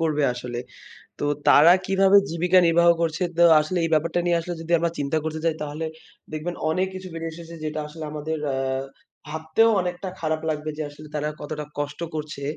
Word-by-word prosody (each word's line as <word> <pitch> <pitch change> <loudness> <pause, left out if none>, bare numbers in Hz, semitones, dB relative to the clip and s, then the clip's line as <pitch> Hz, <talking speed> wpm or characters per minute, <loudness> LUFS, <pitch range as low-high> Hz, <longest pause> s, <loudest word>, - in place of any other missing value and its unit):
করবে 155 -2 +1
আসলে। 120 -1 -5 0.6
তো - - -1 0.2
তারা 165 +5 +8
কিভাবে 195 +1 +5
জীবিকা 175 +2 +3
নির্বাহ 170 +1 +5
করছে, 165 +1 0
তো 175 - +6 0.2
আসলে 155 +4 -1
এই 165 - 0
ব্যাপারটা 165 +3 +1
নিয়ে 175 -1 +3
আসলে, 175 +1 -4
যদি 165 +1 -7
আমরা 170 0 0
চিন্তা 145 +2 0
করতে 160 0 -3
যাই, 165 - +2
তাহলে 150 +2 -4 0.5
দেখবেন 155 +3 -4
অনেক 185 +4 +1
কিছু 185 0 -7
বেরে 165 0 -4
এসেছে 170 0 -10
যেটা 155 0 -3
আসলে 155 +1 -9
আমাদের 155 +1 -3 0.2
আ - - -1 0.7
ভাবতেও 160 +8 +2
অনেকটা 180 +1 -4
খারাপ 155 -1 -1
লাগবে 155 0 -2
যে, - - -3
আসলে 150 +1 -12
তারা 150 0 -1
কতটা 150 0 -5
কষ্ট 145 +2 -4 0.2
করছে। 150 -2 -5
160 Hz, 185 wpm, -24 LUFS, 150-170 Hz, 0.7 s, তারা